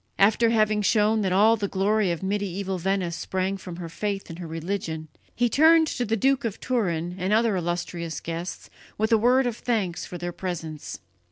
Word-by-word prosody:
After 220 +3 +4
having 215 -2 +2
shown 215 +1 +3
that 190 -2 0
all 210 +5 +5
the 205 -2 -2
glory 200 +1 +1
of 170 +1 -3
medieval 195 -1 -2
Venice 185 -1 -1
sprang 190 +3 -2
from 185 -3 -8
her 170 -1 -6
faith 195 +2 -4
and 165 - -9
her 175 - -6
religion, 165 -1 -4 0.3
he 245 - +2
turned 320 +6 +5
to 245 - -2
the 225 +1 0
Duke 270 +5 +2
of 225 -4 -3
Turin 175 -9 -1
and 185 +3 -1
the - - +5
other 225 -3 +2
illustrious 175 -1 -3
guests 170 +2 -6 0.3
with 220 +2 0
a 225 - +6
word 250 +4 +4
of 240 -2 -2
thanks 205 -8 -1
for 180 - -7
their 175 +1 -4
presence. 165 -4 -6
195 Hz, 195 wpm, -25 LUFS, 175-220 Hz, 0.3 s, a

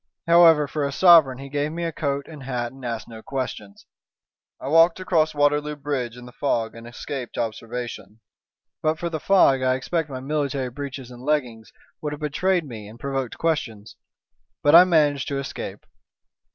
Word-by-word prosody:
However, 165 -3 +6
for 150 +1 -3
a 140 - -1
sovereign 160 -5 +6
he 135 +1 -8
gave 145 +2 -2
me 170 +2 -4
a 165 - -1
coat 140 -2 -2
and 155 -3 -11
hat, 125 -3 -3
and 135 0 -15
asked 115 -2 -4
no 110 -1 -10
questions. 110 -7 -6 0.7
I - - -7
walked 165 +4 +5
across 160 -4 +1
Waterloo 145 +1 +1
Bridge 135 -5 -4
in 125 - -11
the 125 - -11
fog 115 -4 -1
and 115 0 -11
escaped 125 +1 -7
observation. 115 0 -5 0.6
But 155 0 +1
for 170 +1 -4
the 160 - -3
fog 145 -8 +4
I 130 0 +2
expect 160 +4 -2
my 130 -2 -5
military 140 -2 -2
breeches 135 -1 -7
and 120 0 -11
leggings 125 -6 -2 0.3
would 150 -1 -3
have 150 - -7
betrayed 170 +4 0
me 110 -6 -9
and 110 +3 -13
provoked 135 -2 -3
questions. 115 -10 -2 0.7
But 145 - +4
I 175 +2 +10
managed 150 -6 +2
to 140 - -2
escape." 140 - -6
140 Hz, 180 wpm, -23 LUFS, 125-155 Hz, 0.7 s, I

